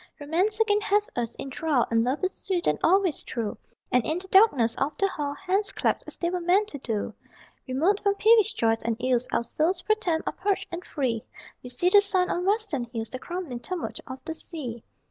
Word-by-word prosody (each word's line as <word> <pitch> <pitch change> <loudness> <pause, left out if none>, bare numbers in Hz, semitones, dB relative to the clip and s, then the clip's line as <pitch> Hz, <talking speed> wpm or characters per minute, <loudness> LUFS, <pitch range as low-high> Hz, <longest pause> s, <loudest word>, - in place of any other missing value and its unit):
Romance 360 +9 0
again 420 -2 +3
hath 415 0 +1
us 235 -1 -2
in 270 - -7
thrall 285 -3 +1
And 230 0 +3
Love 260 +8 -1
is 370 - +1
sweet 360 -3 -2
and - - +1
always 370 -3 +3
true, 225 -4 -3 0.4
And 250 -1 +3
in 315 +8 -1
the 375 +1 -6
darkness 290 - +5
of 275 +3 -1
the 390 - +3
hall 290 -6 -3
Hands 390 +4 0
clasp - - -1
as - - -6
they 340 0 -1
were 360 - -1
meant 380 +5 +3
to 285 - -7
do. 225 -5 -3 0.5
Remote 325 +11 +2
from 400 -1 +1
peevish 440 0 +5
joys 225 0 +1
and 230 -1 -1
ills 250 -1 +1
Our - - +1
souls, 340 +9 0
pro 430 - +3
tem, 345 -7 -1
are - - -2
purged 395 0 -1
and 345 +1 -5
free: 250 -9 -2 0.4
We 250 - -9
see 250 +9 +1
the 405 +2 +7
sun 380 -3 +1
on 355 +1 -1
western 405 - 0
hills, 230 -2 -6
The 255 - -5
crumbling 340 -6 -5
tumult 360 +7 -5
of 260 -1 -6
the 320 - -3
sea. 265 -9 -6
330 Hz, 220 wpm, -26 LUFS, 250-390 Hz, 0.5 s, the